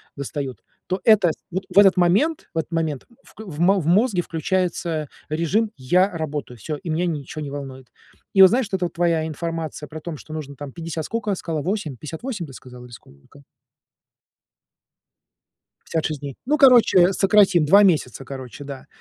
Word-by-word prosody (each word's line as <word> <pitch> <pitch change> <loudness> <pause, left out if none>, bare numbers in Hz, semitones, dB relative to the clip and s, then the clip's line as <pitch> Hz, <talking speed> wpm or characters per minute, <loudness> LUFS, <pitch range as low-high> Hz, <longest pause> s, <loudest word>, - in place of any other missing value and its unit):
достают, 140 -2 -5 0.3
то 185 0 -2
это 215 -6 +5 0.2
вот 190 +2 -3
в - - -5
этот 195 -2 +7
момент, 205 - +2
в - - -6
этот 160 - -2
момент 160 -5 -2 0.2
в - - -19
кл 220 - -9
в 150 0 -8
мо 195 +3 +4
в 155 - -5
мозге 200 +1 +3
включается 170 -3 -2 0.2
режим: 170 +8 0
"Я 180 +10 +2
работаю, 150 -5 -5
всё, 150 +8 -5
и 175 +2 -8
меня 165 +3 0
ничего 155 -2 -4
не 140 - -6
волнует". 135 -2 -8 0.5
И 195 - +6
вот 190 - +10
знаешь, 245 -1 +1
вот 190 -1 -2
эта 175 - 0
твоя 170 -2 0
информация 160 -1 -5
про 155 - -8
том, 165 +1 -6
что 155 - -11
нужно 145 -3 -6
там 145 0 -8
50 165 +1 -5
сколько 220 -3 -2
сказала 160 -4 -4
8, 180 -4 -3
58, 175 - -6
ты 135 - -12
сказала, 125 -1 -12
или 125 - -15
сколько? 115 - -17 2.4
56 155 -3 -2
дней. 140 -2 -7
Ну, 300 +3 +2
короче, 230 -9 +6
сократим 195 -4 +4
2 195 +7 +6
месяца, 145 - +1
короче, 135 +1 -8
да. 140 -2 -9
165 Hz, 175 wpm, -22 LUFS, 145-190 Hz, 2.4 s, вот